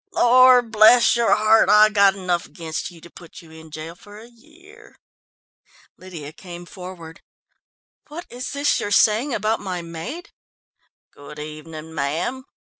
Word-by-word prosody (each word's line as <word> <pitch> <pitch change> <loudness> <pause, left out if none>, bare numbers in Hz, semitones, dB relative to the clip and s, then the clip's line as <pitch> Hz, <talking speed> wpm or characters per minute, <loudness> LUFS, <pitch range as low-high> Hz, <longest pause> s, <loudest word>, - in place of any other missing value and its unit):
Lord 250 -1 +5
bless 220 +3 +5
your 235 -1 +2
heart, 215 +1 +3
I've 215 0 +5
got 200 -1 +4
enough 180 -3 -3
against 160 -2 -6
you 170 -2 -16
to 170 - -14
put 170 0 -14
you 160 - -17
in 160 0 -14
jail 155 +2 -8
for 205 +4 -16
a 220 - -13
year." 350 - -20 1.0
Lydia 165 -5 -11
came 175 0 -11
forward. 180 -2 -11 0.9
"What 325 +4 -9
is 250 +1 -7
this 285 +1 0
you're - - -4
saying 220 +6 +2
about 215 +2 -1
my 180 -3 -6
maid?" 170 - -8 0.8
"Good 145 +1 -13
evening, 155 +1 -10
ma'am." 165 - -3
195 Hz, 145 wpm, -21 LUFS, 165-235 Hz, 1.0 s, Lord